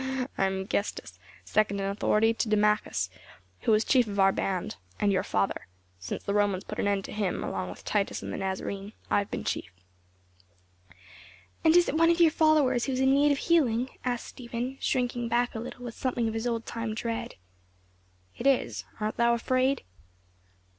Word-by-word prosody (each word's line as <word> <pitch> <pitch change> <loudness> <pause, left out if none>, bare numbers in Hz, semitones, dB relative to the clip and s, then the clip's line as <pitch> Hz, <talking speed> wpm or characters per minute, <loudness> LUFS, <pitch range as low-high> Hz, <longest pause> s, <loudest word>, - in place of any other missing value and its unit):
"I 195 - +2
am 190 0 -1
Gestas; 200 +1 -3 0.3
second 210 -2 +1
in 195 - -1
authority 210 +3 +2
to 225 0 -2
Dumachus, 210 - +2 0.5
who - - +1
was 215 +1 +4
chief 250 -4 +4
of 205 -1 -4
our 195 0 +6
band 185 - -2 0.2
and 205 -1 +3
your 190 - +2
father. 100 - -1 0.3
Since 90 - -5
the 200 - -2
Romans 205 -2 +1
put - - -7
an - - +1
end 200 -1 0
to - - -8
him, 205 -4 -1
along 95 -1 -3
with 90 - -10
Titus 205 -2 -1
and - - -5
the - - -3
Nazarene, 195 +2 -4 0.2
I - - +4
have 200 - -4
been - - -4
chief." - - -3 1.9
"And 320 +1 +5
is 350 - +5
it - - -1
one 330 +1 +5
of 340 0 +3
your 335 -2 +6
followers 295 -6 +3
who 270 - -1
is 255 - -1
in 265 0 +4
need 290 +1 +4
of 285 - +2
healing?" 260 -7 +2
asked 245 -2 -2
Stephen, 245 +2 -5
shrinking 245 -2 0
back 240 +1 +1
a 225 - -4
little 245 +1 -7
with 235 - -5
something 245 -3 -1
of 220 - -2
his 225 +2 -2
old 230 -1 -2
time 230 -2 -4
dread. 230 +1 -3 1.0
"It 265 - -1
is. 275 -2 +1
Art 215 0 -2
thou 235 0 +4
afraid?" 255 +3 +1
230 Hz, 190 wpm, -28 LUFS, 200-255 Hz, 1.9 s, our